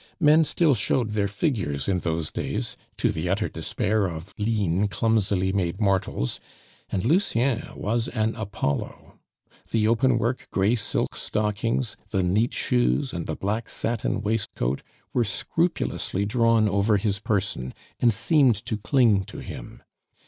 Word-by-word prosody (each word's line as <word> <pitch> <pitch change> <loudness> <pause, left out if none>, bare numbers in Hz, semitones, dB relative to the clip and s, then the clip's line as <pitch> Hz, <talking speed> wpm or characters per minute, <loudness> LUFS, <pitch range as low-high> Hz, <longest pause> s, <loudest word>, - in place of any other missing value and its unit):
Men 155 0 +6
still 155 -1 +3
showed 120 -2 0
their 105 -1 0
figures 95 - -1
in 95 -2 +1
those 80 -2 -2
days, - - -3 0.2
to - - +2
the 80 +3 -3
utter 100 +3 +1
despair 105 +5 -1
of 85 +1 -7
lean, 105 -3 +1
clumsily 100 -3 +1
made 95 -1 -1
mortals; 95 - 0 0.5
and 95 +1 -1
Lucien 130 - +2
was 115 +3 -1
an 110 -1 0
Apollo. 100 -9 -4 0.5
The 110 -1 +2
open 120 +2 +3
work 120 +3 -1
gray 100 +4 +2
silk 115 -4 -1
stockings, 105 +2 -1
the 95 -3 +1
neat 105 +7 +2
shoes, 125 +1 +1
and 85 -2 -4
the 80 - -2
black 105 +6 -2
satin 115 -1 -1
waistcoat 100 - -1 0.3
were 120 - +3
scrupulously 110 - -1
drawn 115 0 +3
over 100 +2 +2
his 100 0 -1
person, 100 -11 -1 0.3
and 120 - +5
seemed 125 +3 +3
to 110 -1 -2
cling 110 -3 +3
to - - -10
him. - - -9
105 Hz, 140 wpm, -25 LUFS, 95-115 Hz, 0.5 s, Men